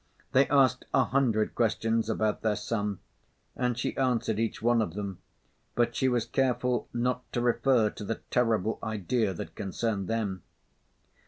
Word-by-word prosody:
They 135 +1 +4
asked 130 -2 +3
a - - +5
hundred 120 -6 +1
questions 115 0 +1
about 110 -1 0
their 110 -2 +1
son, 105 -3 -2 0.6
and 125 -2 0
she 120 - -2
answered 120 -5 +1
each 115 0 -1
one 120 0 +3
of 90 -5 -3
them, 100 -3 -5 0.6
but 120 0 +1
she 130 - +2
was 120 -3 +1
careful 125 -2 0
not 125 +1 -2
to - - 0
refer 120 -2 +3
to 105 - -8
the 115 +2 -4
terrible 110 -3 +1
idea 110 0 0
that - - -7
concerned 100 0 -2
them. 105 -5 -2
115 Hz, 155 wpm, -29 LUFS, 105-125 Hz, 0.6 s, a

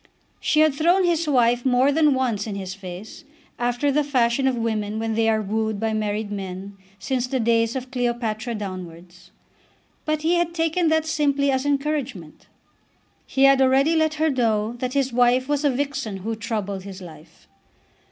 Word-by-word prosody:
She 305 - +2
had 310 -2 +4
thrown 345 +6 +3
his 335 -2 +1
wife 245 -3 +3
more 260 +2 +3
than 300 -2 +3
once 235 -5 -1
in 205 - -4
his 190 -1 -5
face, 190 - -9 0.4
after 245 +4 0
the 300 +2 +2
fashion 265 -2 +1
of 260 - +1
women 220 -2 -2
when 225 0 -2
they 225 0 +2
are 220 -1 +1
wooed 220 +1 -2
by 225 0 -1
married 210 0 -2
men 195 0 -6 0.2
since 255 +3 -2
the 260 +1 -1
days 230 0 +1
of 255 -1 -5
Cleopatra 240 -2 -2
downwards. 180 -3 -8 0.8
But 310 0 -1
he 330 +2 +2
had 340 0 -1
taken 330 +1 +1
that 315 0 +2
simply 285 -3 +1
as 265 +1 -1
encouragement. 275 - -3 0.8
He 270 - +1
had 275 0 +6
already 270 +5 +3
let 315 -1 +1
her 315 0 +1
know 225 -4 0
that 255 0 -3
his 270 -3 0
wife 250 +1 +3
was 290 0 0
a 290 - +4
vixen 265 -6 -3
who 225 0 -2
troubled 210 -3 -4
his 195 0 -9
life. 165 -2 -14
245 Hz, 175 wpm, -23 LUFS, 215-280 Hz, 0.8 s, had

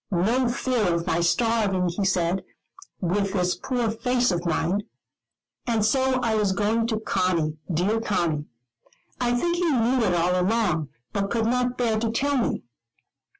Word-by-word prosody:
No 230 +8 +1
fear 240 -7 0
of 170 0 -2
my 170 -2 0
starving, 200 0 +1
he 180 +4 -2
said, 185 0 +1 0.6
with 195 +2 0
this 180 -2 +1
poor 250 -4 -1
face 245 +1 +1
of 175 0 -2
mine. 170 +4 0 0.9
And 225 -3 +1
so 260 +2 +2
I 230 -2 +1
was 210 -3 +1
going 220 +3 +1
to 220 -2 -1
Conny, 170 -7 0
dear 195 +7 +1
Conny; 170 -8 -1 0.7
I 245 -1 +1
think 345 +7 0
he 345 -1 +1
knew 255 -1 +2
it 180 -5 +2
all 175 +1 +2
long 215 +1 +2
ago, 155 -2 -2 0.3
but 200 -1 -1
could 225 0 0
not 250 +1 0
bear 225 -3 +1
to 230 0 -1
tell 280 +5 0
me. 245 - 0
215 Hz, 165 wpm, -25 LUFS, 180-240 Hz, 0.9 s, so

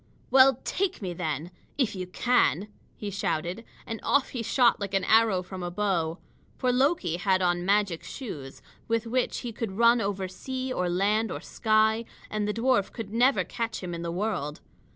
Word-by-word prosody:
"Well, 265 -1 +6
take 380 -1 -1
me, 180 -2 -3
then 160 -1 -3 0.3
if 260 -6 +1
you 185 -2 -5
can!" 210 - +2 0.3
he 205 -1 -5
shouted. 180 +2 -2 0.2
And 225 -1 -5
off 280 -1 +2
he 245 - -4
shot 235 +1 +3
like 200 -1 -3
an 195 - +2
arrow 220 -2 +4
from 185 0 -8
a 175 - -3
bow. 175 -4 0 0.4
For 255 - +1
Loki 250 - +1
had 190 -1 +2
on 175 0 +1
magic 200 -4 +2
shoes, 145 - -8 0.2
with 230 0 0
which 250 +2 -1
he 240 - -4
could 220 -3 -4
run 235 +3 +5
over 195 -2 -2
sea 260 +7 -4
or 180 -5 0
land 210 +5 +1
or - - -4
sky; 220 +1 +2 0.3
and 210 -1 -1
the - - +1
dwarf 230 -4 +2
could 220 -3 -7
never 250 +4 +4
catch 230 -4 -4
him 175 -1 -4
in 170 - -5
the 170 0 -3
world. 175 -6 -2
210 Hz, 185 wpm, -27 LUFS, 180-235 Hz, 0.4 s, Well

